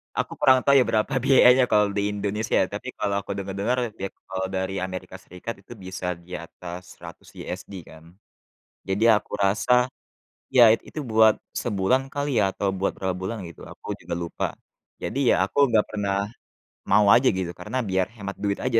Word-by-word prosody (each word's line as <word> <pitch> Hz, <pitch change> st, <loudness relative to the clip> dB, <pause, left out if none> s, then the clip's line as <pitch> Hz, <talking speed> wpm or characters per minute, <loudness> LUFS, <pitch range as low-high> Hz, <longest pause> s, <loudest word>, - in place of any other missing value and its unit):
Aku -, -, -2 dB
kurang 130 Hz, -1 st, +5 dB
tahu 140 Hz, -, +5 dB
ya, -, -, +5 dB
berapa 110 Hz, +6 st, 0 dB
biayanya 130 Hz, -1 st, +6 dB
kalau 105 Hz, -1 st, +4 dB
di 100 Hz, 0 st, -1 dB
Indonesia, 105 Hz, +1 st, -2 dB
ya, -, -, +1 dB
tapi -, -, -6 dB
kalau 100 Hz, -1 st, -1 dB
aku 100 Hz, -, -7 dB
dengar-dengar, 100 Hz, +5 st, -2 dB, 0.2 s
di -, -, -8 dB
at -, -, -20 dB
kalau 95 Hz, 0 st, -2 dB
dari 95 Hz, 0 st, -3 dB
Amerika 95 Hz, 0 st, -5 dB
Serikat 95 Hz, +5 st, -8 dB
itu 100 Hz, -, -12 dB
bisa 95 Hz, -1 st, -4 dB
di 85 Hz, +1 st, -18 dB
atas 90 Hz, +2 st, -10 dB
100 85 Hz, -1 st, -12 dB
USD, -, -, -7 dB, 0.2 s
kan. 80 Hz, 0 st, -14 dB, 0.9 s
Jadi, 100 Hz, +4 st, +1 dB
aku 105 Hz, -, +1 dB
rasa, 125 Hz, +6 st, +3 dB, 0.7 s
ya, 125 Hz, -, +9 dB
it 115 Hz, -, +2 dB
itu 155 Hz, -, -7 dB
buat 110 Hz, 0 st, +6 dB, 0.2 s
sebulan 110 Hz, +3 st, +1 dB
kali 145 Hz, -3 st, 0 dB
ya, -, -, +4 dB
atau 100 Hz, -, -1 dB
buat 100 Hz, -, +1 dB
berapa 95 Hz, -1 st, -2 dB
bulan 95 Hz, +5 st, -4 dB
gitu 85 Hz, -, -13 dB
aku -, -, -13 dB
juga -, -, -4 dB
lupa. 85 Hz, -, -3 dB, 0.6 s
Jadi, 135 Hz, -2 st, +1 dB
ya, -, -, +4 dB
aku 95 Hz, -, -5 dB
nggak 110 Hz, -2 st, +3 dB
pernah 100 Hz, -2 st, -1 dB, 0.7 s
mau 105 Hz, -, +5 dB
aja 130 Hz, +2 st, +4 dB
gitu, 95 Hz, -2 st, -3 dB
karena 90 Hz, +8 st, -4 dB
biar 95 Hz, 0 st, +2 dB
hemat 100 Hz, -3 st, -7 dB
duit 100 Hz, -1 st, 0 dB
aja. 120 Hz, -3 st, +2 dB
100 Hz, 185 wpm, -24 LUFS, 95-115 Hz, 0.9 s, ya